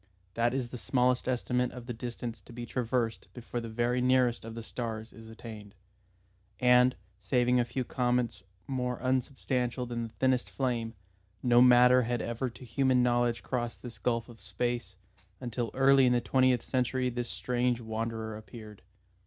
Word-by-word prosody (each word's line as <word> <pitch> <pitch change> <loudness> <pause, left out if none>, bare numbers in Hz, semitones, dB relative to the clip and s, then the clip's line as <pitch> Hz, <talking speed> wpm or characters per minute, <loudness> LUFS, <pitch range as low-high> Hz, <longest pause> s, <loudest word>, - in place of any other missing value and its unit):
That 120 +3 +1
is 130 -3 -2
the 125 - -7
smallest 125 0 +1
estimate 125 0 0
of 125 -1 -9
the 120 - -4
distance 120 -1 -6
to - - -15
be 120 0 -6
traversed 120 -2 -1
before 120 0 -5
the 115 - -6
very 120 +2 0
nearest 125 -1 +3
of 115 0 -8
the 115 - -6
stars 110 0 -5
is 115 0 -12
attained. 110 -3 -10 0.8
And, 125 0 +5 0.2
saving 125 +2 +2
a 120 - +2
few 125 +2 -3
comets 120 -4 0 0.3
more 125 -2 -2
unsubstantial 130 -1 -1
than 120 -1 -4
the 110 - -17
thinnest 130 -1 +1
flame, 120 -4 -2 0.5
no 120 -1 +5
matter 125 0 +7
had 120 0 -1
ever 120 +3 -2
to 120 +2 -12
human 130 +1 +2
knowledge 120 -1 +1
crossed 120 -2 -3
this 115 -3 -8
gulf 115 +1 0
of 115 -4 -14
space, 100 +1 -3 0.4
until 120 -2 -3
early 135 0 +5
in 125 - +4
the 120 - +3
twentieth 130 -2 +2
century 125 0 0
this 120 0 -3
strange 125 -1 0
wanderer 110 -1 -4
appeared. 110 -1 -11
120 Hz, 165 wpm, -30 LUFS, 115-125 Hz, 0.8 s, matter